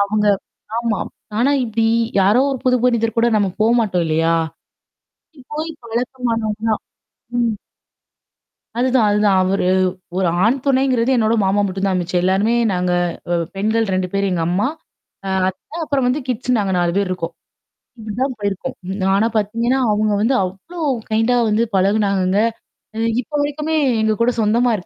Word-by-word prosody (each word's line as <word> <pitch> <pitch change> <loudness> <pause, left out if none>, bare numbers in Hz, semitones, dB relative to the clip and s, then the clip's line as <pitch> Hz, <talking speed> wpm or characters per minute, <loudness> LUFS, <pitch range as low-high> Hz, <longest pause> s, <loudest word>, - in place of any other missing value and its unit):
அவங்க 210 +1 0 0.5
ஆமா. 230 -4 -1 0.4
ஆனா 250 +4 +3
இப்டி 225 0 0 0.3
யாரோ 205 +6 +4
ஒரு 270 - -2
புது 250 0 +4
மனிதர் 230 -2 +1
கூட 230 - +4
நம்ம 205 -2 +2
போமாட்டோம் 220 -7 +2
இல்லையா? 165 +1 +2 0.9
அப்டி 305 -4 -18
போய் 310 +2 -3
பழக்கமானவங்க 230 -2 -2
தான். 215 - 0 0.6
ம். 235 -2 +2 1.3
அதுதான், 250 -3 +3
அதுதான். 205 -2 +3
அவர் 195 +2 0 0.5
ஒரு 185 -1 +1 0.2
ஆண் 235 +5 +3
துணைங்கிறது 260 -3 +2
என்னோட 225 -1 +2
மாமா 195 +2 +2
மட்டும் 190 +1 -2
தான் 185 -1 +1
மிச்சு. 175 +1 -3
எல்லாருமே 195 +5 +2 0.2
நாங்க 180 -1 0 0.4
அ - - +3 0.2
பெண்கள் 220 +3 +1
2 185 -1 -1
பேரு 200 0 0
எங்க 170 -2 0
அம்மா 190 +7 +1 0.6
அ - - -2 0.2
அத்த 245 - -8
அப்புறம் 275 -4 0
வந்து 255 +4 +1
கிட்ஸு 250 0 -2
நாங்க 195 -2 0
4 175 -1 +1
பேர் 200 -1 +1
இருக்கோம். 170 -2 -3 0.7
இப்டிதான் 235 +5 -3
போயிருக்கும். 205 +6 -3 0.4
ஆனா 210 +3 +3
பார்த்தீங்கன்னா, 230 +5 0
அவங்க 215 0 +1
வந்து 230 +5 +2
அவ்ளோ 195 - -7 0.3
கைண்டா 225 +3 +2
வந்து 215 +2 +2
பழகுனாங்கங்க. 195 -1 +2 0.6
அ - - -6 0.2
இப்போ 295 +4 -8
வரைக்குமே 300 +2 -2 0.3
எங்க 220 0 +2
கூட 240 +2 +4
சொந்தமா 235 +3 +2
220 Hz, 145 wpm, -19 LUFS, 195-245 Hz, 1.3 s, யாரோ